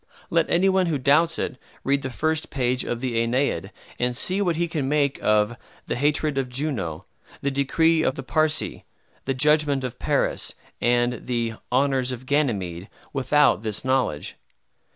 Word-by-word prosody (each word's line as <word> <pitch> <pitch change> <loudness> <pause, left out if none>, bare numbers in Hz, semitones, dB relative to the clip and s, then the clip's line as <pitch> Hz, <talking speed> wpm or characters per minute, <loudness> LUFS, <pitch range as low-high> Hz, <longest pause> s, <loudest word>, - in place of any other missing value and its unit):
Let 165 -1 +2
any 180 +3 +3
one 190 -1 +3
who 160 -3 0
doubts 150 +5 +3
it - - -3 0.3
read 140 +1 +1
the 130 - -4
first 155 +7 -1
page 125 -1 0
of 120 0 -4
the 125 -3 -1
"Aeneid," 125 +4 0 0.3
and 125 0 0
see 190 +7 +2
what 175 -4 +1
he 170 +1 0
can 150 -5 -2
make 145 -2 +1
of 105 +2 +2 0.3
"the - - -2
hatred 145 +1 +1
of 130 -2 -2
Juno," 125 - -3 0.4
the 140 - +1
"decree 160 +4 +2
of 135 - +1
the 135 - -6
Parcae," 155 +2 +1 0.4
the 135 - -1
"judgment 150 0 +3
of 125 -2 -5
Paris," - - 0 0.3
and 120 0 +1
the 120 -2 -1 0.2
"honors 130 0 +2
of 125 0 -7
Ganymede," 105 - -1 0.2
without 145 -3 +3
this 110 +1 -3
knowledge. 130 - -1
135 Hz, 165 wpm, -24 LUFS, 120-150 Hz, 0.4 s, any